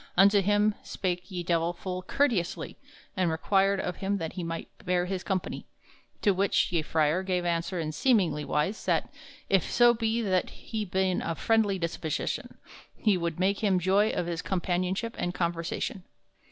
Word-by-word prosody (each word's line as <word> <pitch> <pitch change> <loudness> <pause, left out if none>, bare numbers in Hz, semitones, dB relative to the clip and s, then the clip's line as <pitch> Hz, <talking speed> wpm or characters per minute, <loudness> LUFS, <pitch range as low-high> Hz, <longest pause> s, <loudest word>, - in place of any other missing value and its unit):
Unto 200 +2 +6
him 205 +2 +3
spake 180 -1 -3
ye 180 -2 -4
Divell 170 0 +1
full 185 +1 -5
courteysely, 195 -4 0 0.4
and 185 -3 +1
required 195 +4 +2
of 180 - -3
him 200 +1 -1
that 165 -4 -4
he 180 - -4
might 165 0 -4 0.2
bear 180 -1 +1
him 190 0 -2
company; 190 -1 -3 0.6
to 205 - +5
which 195 0 +2
ye 170 -2 +2
frere 155 +2 +1
gave 180 -2 -1
answer 170 +1 -1
in 155 -2 -2
seemly 185 - +2
wise, 170 +9 -1
that, - - +1 0.3
if 195 -3 +2
so 240 0 +6
be 225 0 0
that 185 -3 +1
he 220 -2 -5
ben 185 -1 0
of 165 -1 -3
friendly 220 -3 +2
disposition, 165 -2 -3 0.4
he 210 -3 +3
wolde 170 -3 -2
make 195 +2 +2
him 200 -4 +2
joy 195 +4 +3
of 175 - -1
his 170 -1 -3
companionship 185 +4 -1
and 175 0 -2
conversation. 170 +4 -2
185 Hz, 165 wpm, -28 LUFS, 170-200 Hz, 0.6 s, Unto